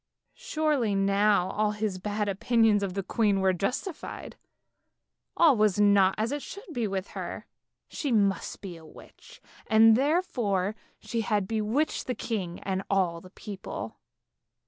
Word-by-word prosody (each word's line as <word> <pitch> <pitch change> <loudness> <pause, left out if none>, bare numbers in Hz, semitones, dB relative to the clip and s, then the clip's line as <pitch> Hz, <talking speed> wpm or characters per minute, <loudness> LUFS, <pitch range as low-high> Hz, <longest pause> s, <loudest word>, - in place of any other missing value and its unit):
Surely 295 -9 0
now 195 -1 +2
all 210 0 0
his 210 -3 -3
bad 210 +2 -2
opinions 215 +1 +2
of 195 -2 -3
the 195 - -2
queen 205 -1 +1
were 190 -1 +3
justified; 250 - -4 1.0
all 320 -5 +6
was 210 -3 +2
not 200 -2 +5
as 220 +3 -1
it 290 0 -2
should 400 - -9
be 235 -5 -1
with 195 -1 -3
her, - - -6 0.4
she 285 - -3
must 200 -4 +1
be 185 -4 -7
a 165 - -13
witch, 155 - -15 0.3
and 220 0 +6
therefore 240 - 0 0.2
she 230 - -3
had 210 -3 0
bewitched 225 +8 -1
the 250 - -1
king 185 -7 -4
and 190 -1 -2
all 180 -4 +1
the 185 - -13
people. 200 0 -7
210 Hz, 145 wpm, -28 LUFS, 195-230 Hz, 1.0 s, all